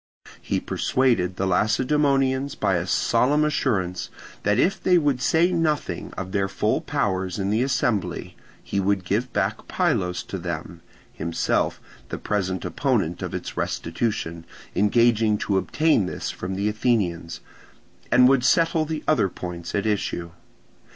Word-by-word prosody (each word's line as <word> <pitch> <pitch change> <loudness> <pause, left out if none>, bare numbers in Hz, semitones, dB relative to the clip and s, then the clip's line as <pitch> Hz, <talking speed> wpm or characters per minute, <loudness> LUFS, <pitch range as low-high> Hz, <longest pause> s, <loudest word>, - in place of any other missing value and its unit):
He - - -1
persuaded 115 -9 +1
the 95 - -1
Lacedaemonians 130 +7 +2
by 95 -3 +1
a 90 +1 -3
solemn 130 +10 +2
assurance 100 -12 -1 0.3
that 105 +1 +2
if 195 +2 +2
they 180 -1 +4
would 145 -6 +1
say 165 +7 +3
nothing 160 -4 -1
of 95 0 -5
their 100 -1 +1
full 95 - 0
powers 95 -2 -1
in 100 0 -1
the 110 +3 +2
assembly, 100 -9 -1 0.3
he 100 - -2
would 95 -1 0
give 115 +7 -1
back - - -1
Pylos 90 -1 0
to 95 - -6
them 85 0 -5 0.3
(himself, 85 +1 -1 0.3
the - - -4
present 95 -3 -2
opponent 100 - 0
of - - -4
its - - -5
restitution, 85 -2 -2 0.3
engaging 110 +1 +3
to 100 -2 0
obtain 150 - +2
this - - -4
from 95 +1 -5
the 100 +2 -1
Athenians), 105 -7 0 0.7
and 125 0 +7
would 135 -1 +4
settle 165 +3 +3
the 155 0 -4
other 125 -11 +3
points 90 -1 -6
at 100 - 0
issue. 100 -5 -1
105 Hz, 145 wpm, -24 LUFS, 90-130 Hz, 0.7 s, and